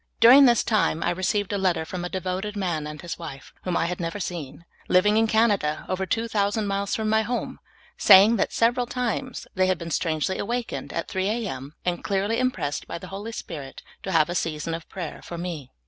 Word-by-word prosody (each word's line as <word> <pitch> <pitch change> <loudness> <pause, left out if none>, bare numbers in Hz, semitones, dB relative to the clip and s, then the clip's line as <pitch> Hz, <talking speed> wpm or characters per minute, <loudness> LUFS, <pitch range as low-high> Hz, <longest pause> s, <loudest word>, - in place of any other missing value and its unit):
During 255 +5 +9
this 240 -3 +4
time, 205 -7 +1
I 175 - +1
received 190 +3 -1
a 200 - 0
letter 180 -4 +1
from 180 +1 -5
a 180 - -3
devoted 190 +3 -3
man 170 -6 -1
and 150 0 -7
his 175 +1 -6
wife, 145 -5 -9
whom 180 -2 0
I - - +1
had 180 +1 -3
never 170 +4 -3
seen, 170 -3 -6 0.2
living 195 +3 +4
in 225 +1 +4
Canada, 205 -9 +2
over 190 0 -2
two 225 +5 0
thousand 205 0 0
miles 200 0 -1
from 220 -1 0
m} 220 0 +4
home, 245 +2 -3 0.4
saying 205 +3 +8
that - - 0
several 240 +2 +2
times 250 +1 -3
they 185 0 +2
had 185 -1 +1
been 170 0 -7
strangely 160 +3 0
aw^akened 240 +2 -3
at - - -3
3 190 0 -1
A. 225 0 -1
M., 135 0 -7
and 175 -1 -1
clearly 205 +3 0
impressed 255 - -1
b}' - - -5
the - - -10
Hoi}' 200 +3 -6
Spirit 150 -11 -7 0.2
to 190 - -4
have 160 -3 +4
a 175 - -3
season 165 -1 -2
of 165 0 -6
prayer 175 -5 -6
for 170 - -7
me. 165 -6 -5
190 Hz, 215 wpm, -25 LUFS, 170-220 Hz, 0.4 s, During